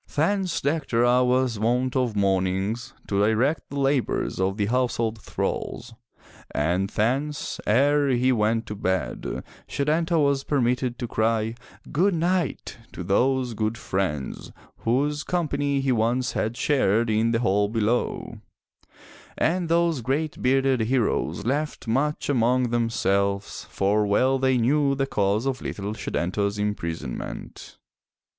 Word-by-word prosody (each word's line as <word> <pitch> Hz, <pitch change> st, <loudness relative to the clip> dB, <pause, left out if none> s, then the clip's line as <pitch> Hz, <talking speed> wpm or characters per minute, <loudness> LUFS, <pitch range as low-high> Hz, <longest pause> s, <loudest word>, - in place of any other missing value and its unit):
Thence 180 Hz, +3 st, +1 dB
Dectera 125 Hz, -5 st, +2 dB
was 125 Hz, -3 st, +1 dB
wont 125 Hz, +4 st, +1 dB
of 125 Hz, -4 st, 0 dB
mornings 95 Hz, +3 st, 0 dB
to 100 Hz, -, 0 dB
direct 120 Hz, +9 st, +1 dB
the 140 Hz, -, -4 dB
labors 135 Hz, -7 st, 0 dB
of 95 Hz, +1 st, 0 dB
the 105 Hz, -, +1 dB
household 115 Hz, -1 st, 0 dB
thralls, 120 Hz, 0 st, -4 dB, 0.6 s
and 90 Hz, +6 st, 0 dB
thence, 135 Hz, +8 st, -1 dB
ere 140 Hz, +5 st, +3 dB
he 130 Hz, 0 st, +3 dB
went 110 Hz, -1 st, +1 dB
to 105 Hz, -, -6 dB
bed, 95 Hz, -, -2 dB, 0.2 s
Setanta 160 Hz, +4 st, 0 dB
was 140 Hz, -2 st, +2 dB
permitted 125 Hz, -2 st, 0 dB
to 120 Hz, -, -4 dB
cry 110 Hz, 0 st, 0 dB, 0.4 s
"Good 185 Hz, +5 st, +2 dB
night," 170 Hz, -6 st, -1 dB
to 90 Hz, -, -6 dB
those 125 Hz, +6 st, +1 dB
good 110 Hz, +1 st, -1 dB
friends, 90 Hz, -, -3 dB, 0.3 s
whose 145 Hz, +5 st, 0 dB
company 145 Hz, -5 st, 0 dB
he 135 Hz, -1 st, +1 dB
once 120 Hz, +2 st, +1 dB
had 110 Hz, +3 st, -2 dB
shared 115 Hz, -5 st, +2 dB
in 110 Hz, +2 st, +2 dB
the 115 Hz, 0 st, +1 dB
hall 100 Hz, -1 st, +2 dB
below; 115 Hz, +2 st, -1 dB, 1.0 s
and 170 Hz, +1 st, +1 dB
those 170 Hz, -4 st, +2 dB
great 140 Hz, +6 st, -2 dB
bearded 135 Hz, 0 st, +2 dB
heroes 115 Hz, -2 st, 0 dB
laughed 145 Hz, +1 st, -2 dB
much 140 Hz, +6 st, 0 dB
among 125 Hz, -2 st, +2 dB
themselves, 100 Hz, -4 st, 0 dB
for 100 Hz, +2 st, +1 dB
well 130 Hz, +6 st, +2 dB
they 130 Hz, -1 st, +2 dB
knew 140 Hz, +4 st, +2 dB
the 135 Hz, 0 st, 0 dB
cause 105 Hz, -1 st, 0 dB
of 135 Hz, -2 st, -2 dB
little 100 Hz, +1 st, -4 dB
Setanta's 100 Hz, 0 st, -2 dB
imprisonment. 85 Hz, -10 st, -5 dB
120 Hz, 130 wpm, -25 LUFS, 105-140 Hz, 1.0 s, ere